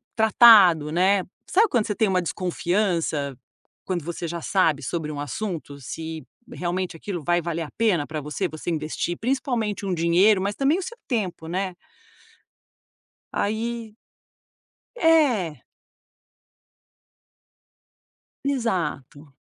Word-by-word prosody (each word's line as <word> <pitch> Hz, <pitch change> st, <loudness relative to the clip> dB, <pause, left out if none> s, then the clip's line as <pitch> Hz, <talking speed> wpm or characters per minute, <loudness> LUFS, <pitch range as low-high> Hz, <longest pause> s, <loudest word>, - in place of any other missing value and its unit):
tratado, 210 Hz, -9 st, +7 dB
né. 185 Hz, +3 st, +3 dB, 0.3 s
Sabe 430 Hz, +4 st, +4 dB
quando 235 Hz, -8 st, +1 dB
você 210 Hz, -, -2 dB
tem 220 Hz, -, +2 dB
uma 185 Hz, -1 st, +2 dB
desconfiança? 170 Hz, -4 st, -1 dB, 0.5 s
Quando 175 Hz, -4 st, -2 dB
você 170 Hz, 0 st, -4 dB
já 170 Hz, 0 st, -5 dB
sabe 160 Hz, -7 st, +1 dB
sobre 155 Hz, +3 st, -3 dB
um 145 Hz, -, -6 dB
assunto, 145 Hz, -, -5 dB
se 160 Hz, +2 st, -6 dB, 0.3 s
realmente 180 Hz, 0 st, -3 dB
aquilo 175 Hz, -2 st, -5 dB
vai 175 Hz, +2 st, +2 dB
valer 165 Hz, 0 st, -3 dB
a 150 Hz, -, -9 dB
pena 200 Hz, -10 st, +2 dB
pra 155 Hz, -1 st, -4 dB
você, 150 Hz, +6 st, -2 dB
você 155 Hz, 0 st, -6 dB
investir, 160 Hz, +2 st, -2 dB
principalmente 235 Hz, -5 st, -1 dB
um 185 Hz, -, 0 dB
dinheiro, 175 Hz, +5 st, +4 dB
mas 200 Hz, +1 st, -2 dB
também 280 Hz, +5 st, +2 dB
o -, -, -3 dB
seu 470 Hz, +5 st, -8 dB
tempo, 190 Hz, -, -2 dB
né. 185 Hz, +2 st, -2 dB, 1.6 s
Aí 220 Hz, +1 st, -2 dB, 1.0 s
É. 255 Hz, -, +3 dB, 2.8 s
Exato. 170 Hz, -, -2 dB
180 Hz, 115 wpm, -24 LUFS, 160-220 Hz, 2.8 s, tratado